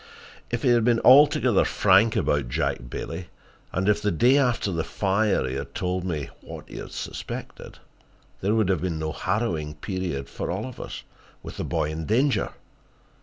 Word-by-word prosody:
If - - -3
he 130 - +3
had 120 -2 +4
been 120 0 +3
altogether 130 -4 +6
frank 105 +3 +4
about 70 -4 0
Jack - - -2
Bailey, 85 +7 -6 0.4
and 95 +2 -1
if 105 0 +3
the 105 - +1
day 120 - +4
after 125 -7 +2
the 85 -2 -1
fire 100 -4 +1
he 65 - -3
had 70 - -6
told 90 0 -2
me 80 -6 -3
what - - -10
he - - -10
suspected, - - -7 0.6
there 100 +3 +1
would 110 -4 +2
have 95 -4 +1
been 85 -3 -2
no 80 0 -2
harrowing 85 -5 -2
period 85 -4 -4
for - - -5
all 95 +5 -2
of 130 -2 -9
us, - - -7 0.4
with - - -8
the - - -3
boy 75 - -1
in 80 0 -5
danger. 125 +1 +2
95 Hz, 175 wpm, -25 LUFS, 80-115 Hz, 0.6 s, altogether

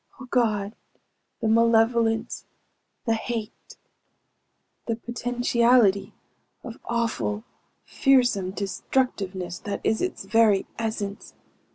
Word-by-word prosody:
Oh 260 - -8
God, 215 -5 0 0.7
the 225 - 0
malevolence, 225 0 +2 0.6
the 230 - +2
hate 225 -1 -5 1.1
the 230 - 0
potentiality 240 -3 +2 0.5
of 240 -2 -8
awful, 230 -2 -1 0.4
fearsome 245 -9 +2
destructiveness 195 -2 -2
that 200 -1 -4
is 220 0 +1
its 365 - -3
very 210 -1 +3
essence! 210 -3 -4
225 Hz, 85 wpm, -25 LUFS, 205-240 Hz, 1.1 s, very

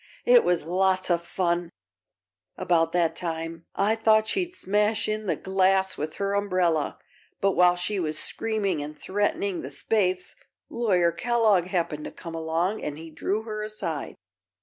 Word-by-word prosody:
It - - +7
was 175 -3 +1
lots 185 +2 +1
of 170 -1 +1
fun, 175 -1 -1 0.9
about 165 -2 +2
that 165 -2 +1
time. 165 -1 -4
I 210 +3 +2
thought 220 -1 +4
she'd 355 - -1
smash 210 - 0
in 215 0 -2
the 170 - +1
glass 190 +2 +2
with 155 +1 -4
her 200 0 -1
umbrella; 185 -6 +1 0.4
but 195 - +2
while 180 -1 +4
she 195 +3 -2
was 155 -3 -2
screaming 205 -7 -1
an' 150 +1 -6
threatening 200 0 -1
the - - -6
Spaythes, 185 +4 0 0.4
Lawyer 185 -8 +2
Kellogg 215 0 +2
happened 170 -5 -2
to - - -6
come 165 -2 -9
along 165 +5 -1
and 150 -1 -4
he 160 0 -10
drew 205 +7 -2
her 215 -1 -5
aside. 210 -8 -4
185 Hz, 155 wpm, -26 LUFS, 165-210 Hz, 0.9 s, It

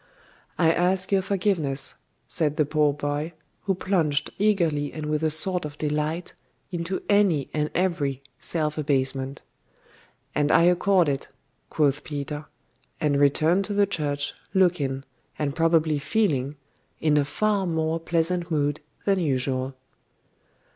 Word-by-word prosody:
'I 165 -2 +4
ask 185 +3 +1
your 195 -1 +4
forgiveness,' 180 -8 -1 0.3
said 155 -3 0
the 150 - +3
poor 150 0 +2
boy, 145 +3 -3 0.3
who 195 -2 +1
plunged 165 -6 0
eagerly 170 -9 +1
and 155 -1 -6
with 150 0 -1
a 160 - +2
sort 180 +4 +3
of 150 -1 -7
delight 150 +3 -2 0.4
into 175 +1 -3
any 195 -9 +3
and 150 0 0
every 150 -7 0 0.2
self 155 -2 -1
abasement. 135 -2 0 0.9
'And 150 0 +1
I - - +6
accord 180 0 +4
it,' 140 -1 -2 0.4
quoth 145 -2 +1
Peter; 145 0 -5 0.5
and 145 -2 +1
returned 155 +6 +3
to 205 - -3
the 205 0 +4
church, 145 -6 -2 0.2
looking, 150 -8 +2 0.3
and 145 -2 -2
probably 165 -2 +2
feeling, 145 - 0 0.4
in 155 -1 +2
a 145 - +4
far 200 +6 0
more 160 0 0
pleasant 170 +1 0
mood 145 -2 0 0.3
than 195 -1 +3
usual. 130 -3 -1
155 Hz, 135 wpm, -25 LUFS, 145-180 Hz, 0.9 s, I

